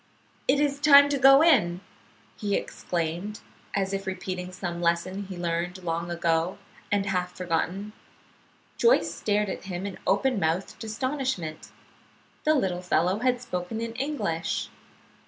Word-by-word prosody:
"It 275 +2 +4
is 285 -1 +1
time 285 -1 +8
to 285 -1 0
go 270 +3 +8
in!" 185 - +4 0.5
he 205 -1 -1
exclaimed, 175 +5 -3 0.3
as 195 -1 0
if 195 0 -3
repeating 185 -1 -4
some 175 -2 -5
lesson 180 +3 0
learned 175 0 -3
long 170 0 -2
ago, 170 0 0 0.3
and 200 -1 +2
half 180 -2 -2
forgotten. 180 +4 -2 0.8
Joyce 475 +1 +4
stared 210 0 0
at 190 - -5
him 185 0 -4
in 200 -2 -6
open 215 +4 +2
mouthed 170 +6 -1
astonishment. 225 - -3 0.8
The 310 0 +4
little 185 -9 0
fellow 180 +2 +1
had 250 0 +1
spoken 200 -1 -4
in 230 0 -4
English. 235 - -2
190 Hz, 135 wpm, -27 LUFS, 175-235 Hz, 0.8 s, time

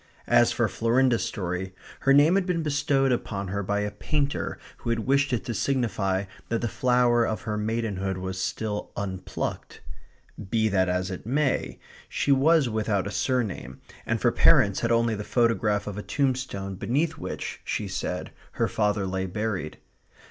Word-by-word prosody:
As - - +4
for - - +1
Florinda's 120 +1 +2
story, 95 -1 -3 0.2
her 135 - +2
name 145 +5 +6
had 195 -1 +2
been 170 -3 0
bestowed 145 -2 +2
upon 100 -5 -2
her 100 +2 -2
by 100 +1 -1
a 105 0 -2
painter 145 +3 -2 0.2
who - - -5
had 115 -1 +1
wished 140 +1 +2
it 120 - -1
to 120 - -2
signify 110 -8 0 0.3
that 115 - 0
the 120 - 0
flower 125 0 +3
of 110 -4 -2
her 105 - -2
maidenhood 105 -3 -2
was 95 0 -4
still 105 +1 -3
unplucked. 95 -2 -4 0.7
Be 110 0 +2
that 95 -2 +2
as 90 +1 -1
it 95 +3 -7
may, 140 +2 0 0.3
she 145 - 0
was 145 +1 +4
without 110 -4 0
a 100 - -4
surname, 100 - -2 0.2
and - - -1
for - - +3
parents 100 -1 +5
had 115 - 0
only 115 -1 +3
the 105 0 -4
photograph 115 -3 +1
of 105 0 -5
a - - -3
tombstone 125 -8 -1
beneath 145 - 0
which, - - -5
she - - -2
said, - - -3 0.2
her - - +1
father 105 -2 0
lay 95 0 -2
buried. 100 -4 -3
110 Hz, 170 wpm, -26 LUFS, 100-130 Hz, 0.7 s, name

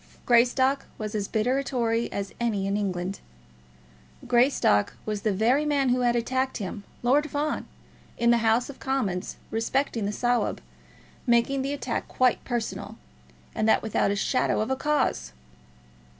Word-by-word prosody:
Greystock 255 +3 +3
was 215 -1 -5
as 205 -2 -2
bitter 245 +5 +1
a - - -2
Tory 235 -3 -1
as 200 -1 -4
any 215 -5 0
in 195 +1 0
England. 190 -2 -2 1.1
Greystock 240 - +3
was 210 -1 -3
the 215 - +1
very 235 +9 +2
man 285 -3 +1
who 250 +1 +2
had 240 -1 +2
attacked 260 +3 0
him, 205 0 -5 0.2
Lord 290 +5 +3
Fawn, 295 +2 -2 0.5
in 235 0 +3
the 235 - +4
House 225 +2 +2
of 280 - -10
Commons 215 -9 -2 0.2
respecting 225 -1 0
the - - -1
Sawab, 245 +3 0 0.7
making 240 +3 +3
the 275 +1 -2
attack 260 -4 -3
quite 255 -1 +2
personal, 240 -3 -4 0.6
and 220 - +1
that - - +4
without 220 -2 +1
a 200 - 0
shadow 230 +6 +1
of 215 +4 -1
a - - +2
cause! 265 - 0
235 Hz, 155 wpm, -26 LUFS, 215-265 Hz, 1.1 s, the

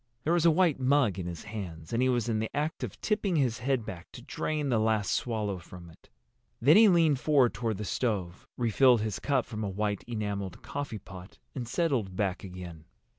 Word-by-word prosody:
There 165 - +1
was 170 -1 +4
a - - +8
white 165 -3 +3
mug 130 -7 +2
in 90 - -4
his 85 -1 -6
hands, 90 -6 -7
and 115 - +1
he 130 - +3
was 120 -3 +1
in 110 -2 0
the 110 - -2
act 150 +2 -2
of - - -6
tipping 210 -4 0
his 125 -7 +1
head 125 -2 0
back 90 -4 -8
to - - -10
drain 150 -2 -2
the 120 -3 +2
last 110 -2 +1
swallow 105 -5 -1
from 85 0 -12
it. 80 - -22 0.5
Then 145 +7 +6
he 220 +1 +8
leaned 165 -6 +4
forward 140 -5 +3
toward 110 -1 -2
the 105 - -4
stove, 95 -7 -2
refilled 120 0 +4
his 110 -2 -3
cup 135 -3 +1
from 110 -2 -5
a 100 - -2
white 105 +1 -2
enameled 100 -5 -4
coffeepot, 100 -9 -7 0.2
and 125 -4 -5
settled 125 - 0
back 95 -2 -1
again. 90 -4 -9
110 Hz, 205 wpm, -29 LUFS, 100-135 Hz, 0.5 s, a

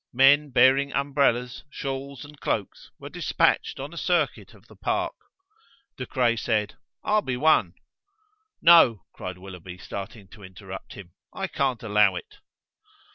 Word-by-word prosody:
Men 145 +3 +5
bearing 135 +2 +4
umbrellas, 135 -3 0
shawls, 135 -1 -6
and 145 0 -15
cloaks 100 -4 -3
were - - -9
dispatched - - 0
on 140 +4 -7
a - - -10
circuit 170 -5 -1
of - - -21
the - - -17
park. - - -2 0.8
De 125 - -6
Craye 120 -3 +1
said: 110 -2 -1 0.3
"I'll 215 0 +2
be 125 -9 -3
one." 155 +4 +3 0.9
"No," 165 - +6
cried 90 -1 -7
Willoughby, 90 -1 -10
starting 100 +2 -8
to 105 - -15
interrupt 95 0 -10
him, 90 -4 -12 0.2
"I - - -3
can't 130 -5 -1
allow 105 -3 +3
it." 85 - -9
125 Hz, 140 wpm, -25 LUFS, 100-140 Hz, 0.9 s, No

